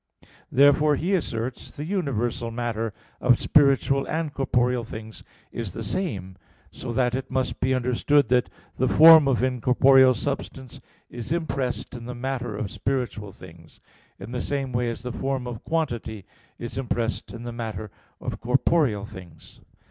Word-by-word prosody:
Therefore, 145 +2 +5
he 175 +7 -1
asserts 125 -8 -3
the 145 - -4
universal 125 - -2
matter 115 -1 -3 0.3
of 125 -2 +4
spiritual 140 -1 +3
and 155 -2 -2
corporeal 125 -2 +1
things 110 -1 -9 0.3
is 115 -6 -5
the 115 - -5
same; 100 - -3 0.3
so 125 - -6
that 125 0 +1
it 130 +1 -3
must 130 0 -2
be 130 +1 +1
understood 130 +4 +2
that 125 0 +2 0.3
the 130 - +2
form 160 +1 +8
of 130 -2 +1
incorporeal 130 +1 +5
substance 135 0 -5 0.3
is 120 +1 -7
impressed 145 -7 -2
in 120 -2 -8
the 125 0 -6
matter 125 -3 -3
of 105 -1 -4
spiritual 115 -2 -3
things, 85 -3 -15 0.4
in - - -9
the 125 -1 -2
same 135 -3 -3
way 120 0 0
as 115 -1 -6
the 125 -1 -4
form 135 -1 -2
of 120 -2 -6
quantity 120 - -2 0.3
is 120 +2 -5
impressed 115 -3 -2
in 115 0 -8
the 120 -1 -6
matter 110 -3 -5 0.3
of - - -5
corporeal 125 -4 +2
things. 90 -6 -13
125 Hz, 155 wpm, -25 LUFS, 115-135 Hz, 0.4 s, form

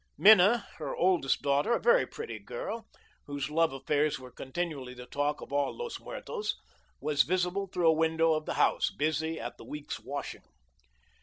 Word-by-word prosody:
Minna, 210 +2 +7
her 150 -4 -4
oldest 175 -6 +2
daughter, 140 +10 +2
a - - +2
very 485 +1 +4
pretty 450 +1 -7
girl, 485 - -6 0.4
whose 145 0 -4
love 165 0 +3
affairs 145 +3 0
were 130 -1 -11
continually 135 -1 -4
the 125 0 -9
talk 145 +3 -1
of - - -9
all 145 0 0
Los 475 0 -5
Muertos, 475 -3 -4 0.4
was 150 -1 +2
visible 185 +2 0
through 175 -2 0
a - - +6
window 160 0 +2
of 155 0 -2
the - - -2
house, - - +3
busy 160 +1 -1
at - - -6
the - - -10
week's 150 -1 -6
washing. - - -6
160 Hz, 170 wpm, -30 LUFS, 145-195 Hz, 0.4 s, Minna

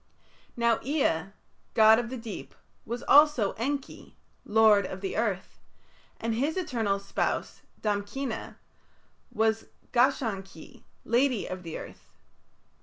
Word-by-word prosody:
Now 235 -1 +2
Ea, 260 - +1 0.5
god 220 0 +7
of 240 -1 -3
the 260 - -5
deep, 225 -2 -8 0.3
was 240 +1 -4
also 290 -8 +5
Enki, 275 +4 -5 0.3
"lord 210 -2 +5
of - - -8
earth", 390 +6 -2 0.6
and 230 0 -1
his 285 +9 -1
eternal 235 - 0
spouse, 200 - -2 0.2
Damkina, 210 +4 -3 0.7
was 220 0 0 0.2
Gashan 240 -5 +2
ki, 190 -5 -15 0.2
"lady 245 -1 +2
of 185 -1 -7
earth". 160 - -9
225 Hz, 110 wpm, -28 LUFS, 205-265 Hz, 0.7 s, god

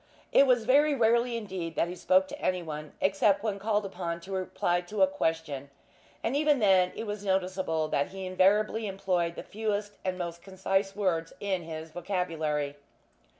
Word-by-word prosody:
It 275 - +6
was 245 -3 +3
very 290 +4 +4
rarely 235 0 +2
indeed 185 -7 -5
that - - +1
he 175 - -6
spoke 185 +1 +3
to - - -8
anyone, 155 -5 -3
except 195 +1 +2
when 205 -3 -1
called 210 0 0
upon 175 -3 -4
to 190 - -10
reply 180 -2 0
to 205 +8 0
a - - +9
question; 160 - -2 0.5
and 235 - 0
even 295 0 +3
then 190 -5 +4
it - - -4
was 205 -1 -5
noticeable 185 -4 0
that 140 - +1
he 190 0 -7
invariably 210 +4 +2
employed 185 -3 -1
the - - -6
fewest 210 -1 -2
and 185 -1 -2
most 170 -1 -5
concise 195 +1 -1
words 170 -5 0
in 195 -3 -1
his 160 -1 -7
vocabulary. 160 -6 -2
190 Hz, 170 wpm, -29 LUFS, 170-210 Hz, 0.5 s, a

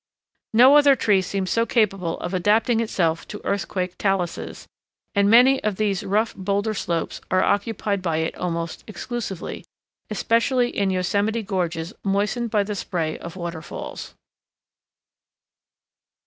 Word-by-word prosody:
No 260 +5 +8
other 285 -2 +6
tree 205 -5 +3
seems 190 0 -3
so 230 - +3
capable 195 -7 0
of 175 - -4
adapting 215 +5 +2
itself 170 -7 0
to 210 - -8
earthquake 185 -2 -2
taluses, 195 -4 -2 0.5
and 200 -1 +3
many 255 +4 +6
of 215 -2 0
these 200 -2 0
rough 215 +3 0
boulder 200 +3 -1
slopes 170 -5 -3
are 185 0 +3
occupied 205 -1 0
by 165 -3 -1
it 160 0 -1
almost 170 -2 -4
exclusively, 220 -4 -5 0.5
especially 240 +2 +1
in 200 -1 +1
yosemite 200 +5 0
gorges 175 -2 -2
moistened 205 +4 0
by 210 -2 +2
the 210 +1 -4
spray 170 -5 -3
of 170 +1 -8
waterfalls. 170 -2 -7
200 Hz, 130 wpm, -23 LUFS, 180-220 Hz, 0.5 s, No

